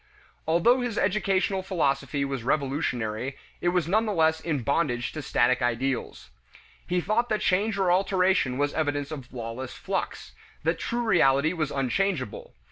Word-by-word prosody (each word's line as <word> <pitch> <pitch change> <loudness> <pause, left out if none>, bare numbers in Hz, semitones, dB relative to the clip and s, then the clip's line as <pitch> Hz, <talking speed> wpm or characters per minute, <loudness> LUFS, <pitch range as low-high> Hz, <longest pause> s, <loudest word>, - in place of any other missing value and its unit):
Although 205 +11 +4
his 245 -3 -3
educational 195 -2 +1
philosophy 145 -6 0
was 135 -2 -3
revolutionary, 130 -3 -1 0.2
it - - 0
was 175 -2 +1
none 215 +5 +2
the 210 - 0
less 160 -2 +3
in 150 -7 -2
bondage 120 -3 0
to 155 - -5
static 125 -2 +2
ideals. 120 +2 -2 0.6
He 180 0 +1
thought 235 +6 0
that 215 -1 0
change 200 +3 +1
or 190 -2 +2
alteration 185 -7 +2
was 145 +1 0
evidence 145 -2 -1
of 135 -5 -7
lawless 120 +1 -6
flux; - - -4 0.3
that 165 +2 0
true 240 +1 -2
reality 140 - +3
was 155 -5 -1
unchangeable. 135 - -2
155 Hz, 150 wpm, -26 LUFS, 135-190 Hz, 0.6 s, Although